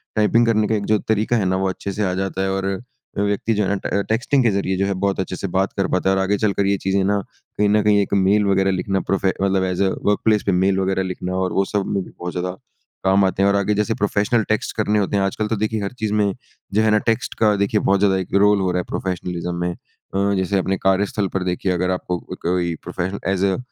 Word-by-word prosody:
Typing 115 +2 +3
करने 110 -2 +2
का 110 - +1
एक 100 -1 -2
जो 105 -1 +2
तरीका 110 +2 0
है 100 - 0
ना, 95 0 +1
वो 95 0 0
अच्छे 95 +1 -5
से 105 - -2
आ 90 - 0
जाता 95 0 -2
है 95 - 0
और 95 0 -2
अ, 100 +1 -6
व्यक्ति 105 +2 0
जो 105 0 +1
है - - -1
ना 100 - +1
ट 100 - 0
टेक्स्टिंग 125 +5 +2
के 115 - +3
ज़रिए 95 -1 -1
जो 100 - +1
है 100 - 0
बहुत 100 -1 0
अच्छे 95 0 -2
से 100 - -4
बात 95 +1 +1
कर 95 - +1
पाता 90 +1 +2
है। 95 - +3
और 95 - +1
आगे 100 +1 +1
चलकर 100 -1 +1
ये 100 0 +2
चीज़ें 95 +1 0
ना, 100 +1 +1 0.4
कहीं 105 0 +3
न 105 +1 +4
कहीं 105 -1 +4
एक 100 - -3
मेल 100 +2 +3
वग़ैरह 95 0 +2
लिखना 95 +1 -1
प्रोफे 95 -1 +1
मतलब 95 -1 +2
ऐज़ 90 +1 0
अ 95 - +2 0.2
वर्कप्लेस 105 +1 +2
पे 100 - +2
मेल 95 +1 +2
वग़ैरह 95 0 0
लिखना 90 0 -4
और 95 -1 -1
वो 95 - +2
सब 100 0 -1
में 100 -1 0
भी - - -13
बहुत 90 0 -4
ज़्यादा 90 +1 -2 0.5
काम 95 +1 +4
आते 95 +1 0
हैं। 100 - +4
और 100 - +2
आगे 100 +1 +1
जैसे 105 +2 0
प्रोफ़ेशनल 105 +3 +1
टेक्स्ट 110 - -1
करने 105 -1 +1
होते 100 +1 -1
हैं, 100 - +2
आजकल 100 +2 -1
तो 110 - -1
देखिए 110 +1 -1
हर 100 - -3
चीज़ 110 -1 -1
में 105 -2 +2 0.4
जो 105 - +3
है 110 - +3
ना 105 - +5
टेक्स्ट 115 - -3
का 105 -2 +4
देखिए 100 +2 +1
बहुत 100 0 +2
ज़्यादा 100 -2 +3
एक 95 - -5
रोल 105 +1 +4
हो 95 - +1
रहा 90 - 0
है - - -2
प्रोफेशनलिज़्म 90 -1 -3
में। 90 - 0
अ, 100 +3 -4
जैसे 95 +1 0
अपने 95 +1 -1
कार्यस्थल 95 +1 +1
पर 95 - -1
देखिए 90 +1 -1
अगर 90 +1 0
आपको 90 -1 -2
अ, - - -9
कोई 85 -1 0
प्रोफेशन 90 +2 -4
ऐज़ 95 0 +1
अ 95 -1 +1
100 Hz, 270 wpm, -21 LUFS, 95-105 Hz, 0.5 s, ना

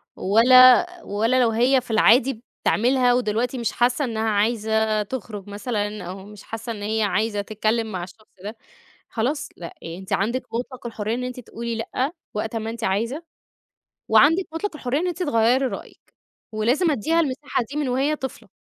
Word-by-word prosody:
ولا، 255 - +7 0.2
ولا 225 +5 +1
لو 235 - +4
هي 250 +4 +3
في 235 - -9
العادي 235 +2 +4 0.2
بتعملها، 245 +2 +3
ودلوقتي 245 +1 0
مش 235 -2 -1
حاسة 245 +4 +1
إنها 220 -2 -1
عايزة 220 0 +1
تخرج 205 -3 -7
مثلًا، 210 -1 -3
أو 190 +2 -8
مش 210 0 -13
حاسة 225 +1 -6
إن 210 -2 -6
هي 220 +1 0
عايزة 210 0 0
تتكلم 215 +2 -1
مع 180 -2 -4
الشخص 210 +4 -13 0.2
ده، 215 +2 -7 0.5
خلاص، 250 +6 -2
لأ، 170 - -7 0.2
أ 165 +1 -7
أنتِ 190 - -9
عندِك 235 +6 0
مطلق 250 +1 -5
الحرّيّة 220 -1 -3
إن 250 +1 -3
أنتِ 250 0 -6
تقولي 235 0 -6
لأ 255 +6 -2 0.2
وقت 220 +2 -3
أمّا 225 0 -3
أنتِ 230 -1 -6
عايزة، 230 - -1 0.9
وعندِك 325 +6 +5
مطلق 330 +1 -3
الحرّيّة 270 0 -1
إن 360 - -1
أنتِ 355 +1 -2
تغيّري 245 -1 +2
رأيِك 255 - -8 0.4
ولازم 245 +10 +1
أدّيها 315 +7 +1
المساحة 285 -3 -1
دي 295 - -4
من 295 -3 -1
وهي 270 +4 +1
طفلة. 265 -3 -7
230 Hz, 170 wpm, -23 LUFS, 215-255 Hz, 0.9 s, ولا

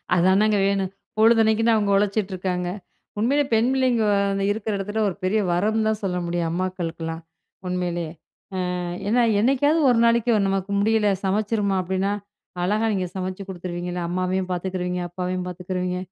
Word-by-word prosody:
அதானங்க 195 +4 +4
வேணும். 195 -1 0 0.3
பொழுதன்னக்கும் 225 0 +4
தான் 230 -1 +5
அவுங்க 205 -2 +1
உழச்சிட்டு 205 0 0
இருக்காங்க. 180 -1 -2 0.5
உண்மையிலே 275 +7 +2
பெண் 225 +2 +3
பிள்ளைங்க 255 -4 +2 0.3
அந்த 195 0 -1
இருக்குற 215 0 -2
இடத்துல 205 +3 -2
ஒரு 180 - -6
பெரிய 205 +4 +2
வரம் 215 +5 +1
தான் 220 -1 0
சொல்ல 180 -2 -1
முடியும். 170 -1 -1
அம்மாக்களுக்குலாம் 170 -2 -3 0.5
உண்மையிலேயே! 175 -2 -2 0.7
அ - - -3 0.3
ஏன்னா, 240 +3 +3 0.2
என்னைக்காவது 275 +7 +3
ஒரு 240 - +3
நாளைக்கு 235 0 +3 0.2
நமக்கு 195 0 -1
முடியல 215 0 +2 0.2
சமைச்சிருமா, 205 0 0
அப்பிடீன்னா, 190 +2 -1 0.5
அழகா 210 +5 +1
நீங்க 190 -3 -1
சமைச்சு 185 +1 -4
குடுத்துருவீங்கள்ல. 175 -1 -4
அம்மாவையும் 185 +1 -1
பாத்துக்கிருவீங்க, 180 0 -2
அப்பாவையும் 180 +1 -3
பாத்துக்கிருவீங்க. 180 0 -3
190 Hz, 140 wpm, -23 LUFS, 180-220 Hz, 0.7 s, தான்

